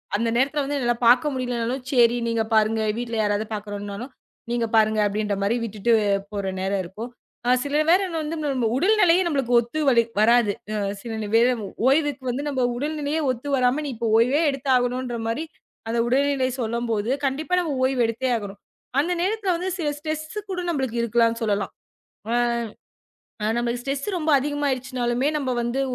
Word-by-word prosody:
அந்த 230 +3 0
நேரத்துல 275 +4 +1
வந்து 285 +1 -2
எல்லாம் 240 0 0
பார்க்க 260 +5 +5
முடியலைனாலும். 250 0 -2
சரி 240 -3 +4
நீங்கப் 225 -1 -1
பாருங்க 220 0 +3 0.2
வீட்டுல 235 -1 -3
யாராவது 205 0 0
பார்க்கறோம்னாலும், 205 +3 -6 0.4
நீங்கப் 235 -2 -1
பாருங்க 215 0 +3
அப்படின்ற 205 0 -1
மாரி 200 +4 +1
விட்டுட்டு 220 +1 0 0.4
போற 200 -2 -3
நேரம் 195 +1 0
இருக்கும். 210 +7 -7 0.4
ஆனா 250 +1 +4
சில 290 +2 +1
நேரம் 360 -1 +3
வந்து 310 +2 -4
நம்ம 255 -5 0
உடல்நிலையை 370 0 +4
நமக்கு 270 -5 0
ஒத்து 240 +7 -3
வழி 235 -3 +5 0.2
வராது. 230 -1 +4 0.5
சில 235 - -7
நிவே 225 +3 +3 0.5
ஓய்வுக்கு 285 -1 +2
வந்து 275 +4 -3
நம்ம 260 -3 0
உடல்நிலையை 300 +2 -2
ஒத்து 255 +3 -6
வராமல் 255 +4 +1
நீ - - -3
இப்போ 230 0 -1
ஓய்வே 255 +7 +3
எடுத்தாகணுன்ற 255 -2 0
மாதிரி 260 +8 -2 0.4
அந்த 230 +1 0
உடல்நிலை 270 +1 +2
சொல்லும்போது, 230 -1 -1 0.2
கண்டிப்பா 305 +6 -3
நம்ம 320 -5 -2
ஓய்வு 260 -1 +2
எடுத்தே 235 +3 -2
ஆகணும். 200 -2 -8 0.4
அந்த 320 +5 +1
நேரத்துல 405 +2 -1
வந்து 360 +2 -2
சில 315 - -1
ஸ்ட்ரெஸ் 310 +6 -5
கூட 370 -1 -3
நம்மளுக்கு 265 -7 -1
இருக்கலாம்னு 230 0 +1
சொல்லலாம். 205 -2 -1 1.7
ஆனா 210 - +1
நமக்கு 240 0 -1
ஸ்ட்ரெஸ் 275 +2 -3
ரொம்ப 315 -2 0
அதிகமா 290 +2 -2
ஆயிடுச்சுனாலுமே, 255 0 -1
நம்ம 275 -3 -2
வந்து 240 +3 -1
245 Hz, 155 wpm, -23 LUFS, 230-285 Hz, 1.7 s, பார்க்க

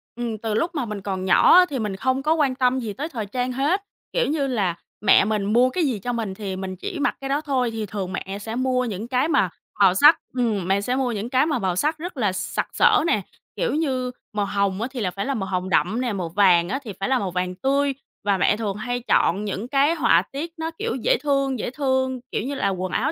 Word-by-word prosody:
Ừm, 235 -2 -3
từ 220 0 -3
lúc 335 +11 -1
mà 275 -5 -1
mình 210 -2 -5
còn 190 -1 -3
nhỏ 185 - +6
á 365 - +8
thì 270 - -3
mình 210 -3 -2
không 260 +5 0
có 310 - +3
quan 285 -5 +1
tâm 255 0 +2
gì 225 -4 -4
tới 300 +9 -5
thời 225 -7 -4
trang 250 +4 -2
hết. 290 +10 +1 0.3
Kiểu - - +1
như 290 -2 0
là, 200 -9 0 0.3
mẹ 210 - +5
mình 210 -1 0
mua 250 +2 +5
cái 355 +5 -1
gì 240 -7 -1
cho 245 +4 -3
mình 220 -5 -3
thì 190 -1 -5
mình 190 0 -5
chỉ 340 - -6
mặc - - +1
cái 270 - -4
đó 285 +2 +1
thôi 260 -5 0
thì 220 -1 -3
thường 190 -2 -5
mẹ 195 +1 -4
sẽ 225 +2 -5
mua 255 0 +1
những 215 0 -4
cái 255 +4 +1
mà 275 - +2 0.3
màu 195 -3 +6
sắc. 295 - +7
Ừm, 220 -7 0
mẹ 195 +1 +2
sẽ 250 +5 -1
mua 260 -2 0
những 215 +1 -4
cái 260 +3 +3
mà 295 -6 0
màu 185 -3 -1
sắc 305 - 0
rất 335 -1 -7
là 210 -6 +1
sặc 185 - -2
sỡ 430 -8 +5
nè, 210 - +2 0.3
kiểu - - -1
như, 260 -5 -1 0.2
màu 205 -1 0
hồng 200 0 -1
á 235 - -1
thì 255 - -6
là 185 -4 -1
phải 200 +2 -4
là 275 - -1
màu 195 -6 -3
hồng 185 0 -2
đậm 220 +7 +1
nè, 240 -4 -1
màu 180 -4 -3
vàng 175 -1 +4
á 265 - -1
thì 215 -5 -7
phải 195 - -1
là 260 -2 +3
màu 190 -3 -3
vàng 180 0 -2
tươi 275 +5 +1 0.3
và 200 -2 +2
mẹ 200 +3 +2
thường 210 -3 -2
hay 245 +3 -2
chọn 200 +5 +2
những 200 +3 -4
cái 285 +5 +3
họa 315 - +4
tiết 315 +5 -5
nó, 320 0 -3
kiểu, 450 +2 -2
dễ - - +2
thương, 275 -3 +1
dễ - - -2
thương, 260 -2 0
kiểu - - -1
như 275 +3 -3
là, 200 - 0
quần 185 -1 -3
áo 275 +7 0
240 Hz, 265 wpm, -23 LUFS, 200-275 Hz, 0.3 s, á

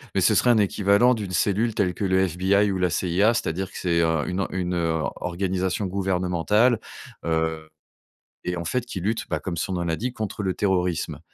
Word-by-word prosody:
Mais - - +2
ce - - +4
serait 125 - +3
un 115 - +4
équivalent 100 +4 +3
d'une 105 -5 -4
cellule 105 +6 +1
telle 90 -3 +1
que 100 - -5
le 95 0 +2
FBI 95 +4 +2
ou 95 - -1
la 90 -1 +2
CIA. 95 +7 +2
C'est-à-dire 95 +4 -2
que - - -9
c'est, 85 -2 +1
heu, 80 -2 +1
une 95 +2 -1
une, 90 -1 -2
heu, 80 -2 0 0.2
organisation 95 +2 -2
gouvernementale, 95 +4 +1 0.5
heu, 80 -1 -1 0.7
et 90 0 -2
en 85 - -5
fait 120 +9 -1
qui 105 - -5
lutte, 110 +5 -1
bah, - - -1
comme 90 -3 -4
son 90 - -2
nom 90 -1 -1
l'indique 115 +10 -2
contre 105 -1 -4
le 95 -1 0
terrorisme 90 -6 -1
95 Hz, 195 wpm, -24 LUFS, 85-100 Hz, 0.7 s, ce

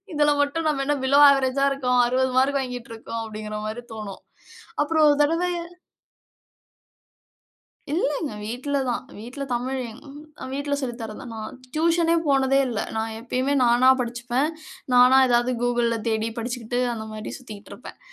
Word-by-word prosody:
இதில 295 0 +3
மட்டும் 315 +3 -2
நம்ம 275 -2 0
என்ன 290 0 +1
பிலோ 280 +2 +5
அவரேஜ்ஜா 270 0 +1
இருக்கோம். 250 -2 +1
60 260 +1 +1
மார்க் 275 +2 +3
வாங்கிட்டு 245 -2 -6
இருக்கோம் 225 0 -6
அப்டிங்கிற 215 -1 -6
மாரி 235 +3 -5
தோணும். 205 -3 -7 0.6
அப்புறம் 310 0 +3
ஒரு 290 - +3
தடவ 330 +4 +1 2.5
இல்லங்க 300 - -1
வீட்ல 255 +6 -3
தான். 245 +1 -2
வீட்ல 245 +6 -7
தமிழ், 260 +2 -2
எங் 220 - -13
ம். 285 +2 -11 0.4
வீட்ல 285 0 -2
சொல்லி 245 -3 -3
தர்றது 215 -1 -7
தான். 240 - -8
நான் 215 +2 -7 0.2
டியூஷன்னே 335 +1 +2
போனதே 270 -1 +3
இல்ல. 225 -3 -2 0.2
நான் 220 0 -2
எப்பயுமே 255 +4 -1
நானா 245 +2 +5
படிச்சுப்பேன். 245 +4 -1 0.5
நானா 250 +2 +7
ஏதாவது 240 +1 +2
Googleல 240 -1 +1
தேடி 220 0 0
படிச்சுக்கிட்டு 245 0 -3
அந்த 220 -1 -6
மாரி 215 0 -6
சுத்திக்கிட்டு 215 -5 -11
இருப்பேன். - - -12
255 Hz, 150 wpm, -24 LUFS, 235-280 Hz, 2.5 s, நானா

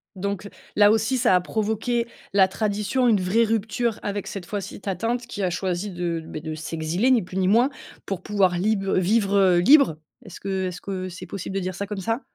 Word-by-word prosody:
Donc, 200 +1 -4 0.3
là, 205 0 +6
aussi, 225 +4 +1
ça 235 -6 +4
a 180 - +3
provoqué, 220 +4 -1 0.3
la 195 -1 +6
tradition, 210 +5 0
une 215 -5 +4
vraie 195 +6 +3
rupture 225 +1 -1
avec 205 -1 -3
cette 195 -3 -6
fois-ci 200 +1 -5
ta 195 -2 -2
tante 230 +6 -1
qui 205 -4 -4
a 185 - +2
choisi 185 +2 -2
de, 170 -2 -2
beh, 155 - -7
de 155 0 -5
s'exiler 160 +8 -1
ni 245 -3 +4
plus 180 +1 -7
ni 190 -1 +2
moins 235 +7 +4 0.4
pour 195 -2 -4
pouvoir 190 -4 +2
lib 200 +2 +1
heu, 195 - 0
vivre 195 -1 +3
libre. 260 - +6 0.3
Est-ce 185 -4 -10
que, 190 -1 -2
est-ce 180 -1 -6
que 185 -1 -4
c'est 185 +1 -9
possible 190 +1 -6
de 195 - 0
dire 185 0 -4
ça 200 - -3
comme 210 -2 -5
ça? 225 +6 -1
200 Hz, 215 wpm, -24 LUFS, 185-220 Hz, 0.4 s, là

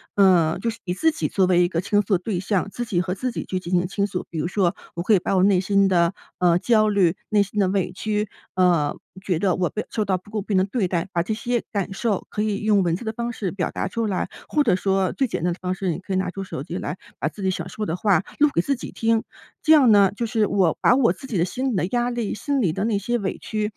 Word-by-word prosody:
呃， 180 -5 +4
就 230 - -1
是 230 - -6
以 180 - -2
自 320 - +2
己 320 - -2
作 190 -2 +2
为 180 -1 +4
一 - - +3
个 170 -2 -2
倾 205 +4 +2
诉 195 -1 +1
的 - - -13
对 190 -2 -2
象， 195 +1 -1
自 240 - -4
己 190 -7 0
和 180 0 -2
自 255 +6 -3
己 - - -5
去 185 - -2
进 175 0 -8
行 175 0 +2
倾 200 +1 -1
诉。 180 -2 -4
比 165 - -7
如 160 - -1
说 185 -2 +1 0.2
我 170 - -3
可 215 - +3
以 195 - +5
把 195 - -1
我 185 - +4
内 195 -2 +4
心 195 0 +3
的， 170 -1 +2 0.3
呃， 175 -1 +4
焦 215 -1 +3
虑、 190 -4 +3
内 210 -1 +4
心 205 +1 -5
的 195 - +3
委 190 -2 0
屈， 210 +2 -2 0.3
呃， 175 -5 +2 0.3
觉 180 -4 0
得 185 0 +1
我 180 -2 0
被 215 - -4
受 215 - 0
到 190 -2 0
不 185 +3 -17
公 215 -2 -2
平 200 -2 0
的 185 - +4
对 195 0 -1
待， 175 0 -1
把 170 - +2
这 185 - -4
些 240 +1 -1
感 200 -2 -2
受 205 -1 -1
可 210 - -2
以 210 -1 -1
用 210 -2 +4
文 170 -2 +1
字 230 - -7
的 220 - -1
方 235 +1 -3
式 200 -6 -3
表 185 -3 -2
达 - - -3
出 225 +3 -2
来。 190 - -1 0.2
或 300 - +2
者 225 -9 +3
说 190 0 +1
最 265 - 0
简 215 - -4
单 175 0 +1
的 175 - -12
方 185 0 -1
式， 185 -2 -1
你 170 - -4
可 190 - -10
以 - - +1
拿 185 -1 0
出 195 +1 -5
手 140 -7 -6
机 170 +3 -5
来 150 +5 -4 0.2
把 - - 0
自 205 - -9
己 190 - +2
想 - - -5
说 215 - -4
的 165 - -2
话 195 -1 +2 0.2
录 295 0 +5
给 170 - +4
自 275 - 0
己 245 - -8
听。 225 -1 +1 0.4
这 315 - +5
样 270 -7 +6
呢， 200 -2 +6
就 235 - -2
是 220 -2 +1
我 185 -5 +2
把 250 - +5
我 260 -4 +3
自 265 - -11
己 220 -7 -2
的 170 - +2
心 260 +7 -2
里 - - -2
的 180 - +1
压 240 0 +1
力， 240 -3 -2
心 280 +4 -1
里 165 -6 +1
的 195 +2 -2
那 220 -3 +1
些 240 +4 -1
委 190 -2 -3
屈 215 -1 -3
195 Hz, 320 characters per minute, -23 LUFS, 180-220 Hz, 0.4 s, 样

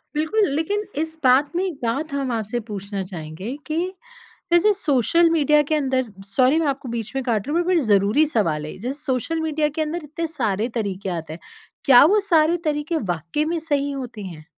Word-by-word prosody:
बिल्कुल, 355 +8 +2
लेकिन 405 +7 -1 0.2
इस 320 0 -5
बात 260 +4 +4
में 365 - +1
एक 365 - -2
बात 280 +6 -2
हम 270 -3 -1
आपसे 225 +1 -2
पूछना 200 -1 -4
चाहेंगे 180 - -7
कि 310 +1 -2 0.8
जैसे 380 +5 +5
सोशल 335 - +3
मीडिया 300 -2 +4
के - - +3
अंदर 260 -6 0 0.2
सॉरी 265 +4 +4
मैं 315 - 0
आपको 275 -2 -2
बीच 230 -2 -4
में 270 - -1
काट 225 -3 0
रही 300 - -1
हूँ, 350 - +3
बट 365 - +2
बट 335 - +4
ज़रूरी 210 +7 +3
सवाल 170 - 0
है - - -6
ये। - - -12
जैसे 255 +7 -4
सोशल 300 +4 -1
मीडिया 310 -1 0
के 310 +2 -2
अंदर 315 +1 -3
इतने 320 +3 -4
सारे 225 -8 -1
तरीके 195 -2 -3
आते 160 -1 -6
हैं। 165 - -9 0.4
क्या 265 -1 +8
वो 410 +6 +4
सारे 320 +1 +4
तरीके 305 +2 -1 0.2
वाक़ई 170 - -2
में 335 +1 -1
सही 285 -3 -1
होते 250 -6 -6
हैं? 165 -5 -9
275 Hz, 205 wpm, -22 LUFS, 215-315 Hz, 0.8 s, क्या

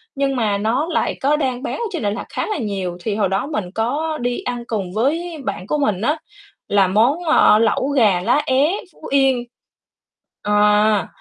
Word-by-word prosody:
nhưng 275 -1 0
mà 215 -5 0
nó 235 +10 0
lại - - 0
có 285 +3 +3
đang 260 -4 -2
bán - - -3
ở 470 - -2
trên 340 - -4
Đà 205 - +1
Lạt 205 - -4
khá - - -3
là 425 - -2
nhiều. 195 -7 -3
Thì 215 -2 -1
hồi 200 -3 +1
đó 195 +7 -1
mình 210 - -4
có 300 +8 -1
đi 245 0 -2
ăn 245 -1 -4
cùng 195 -5 -3
với 320 +9 -1
bạn 185 - -4
của 300 - 0
mình 215 -10 0
á, 300 +7 +1 0.5
là 200 -2 +4
món, 240 - +2
ờ, 310 -9 +5
lẩu 230 +4 +1
gà 215 -10 +3
lá 285 +10 +2
é 290 +7 +2 0.2
Phú - - -14
Yên. 270 -3 +3 1.0
À, 210 -1 +3
240 Hz, 200 wpm, -20 LUFS, 210-285 Hz, 1.0 s, ờ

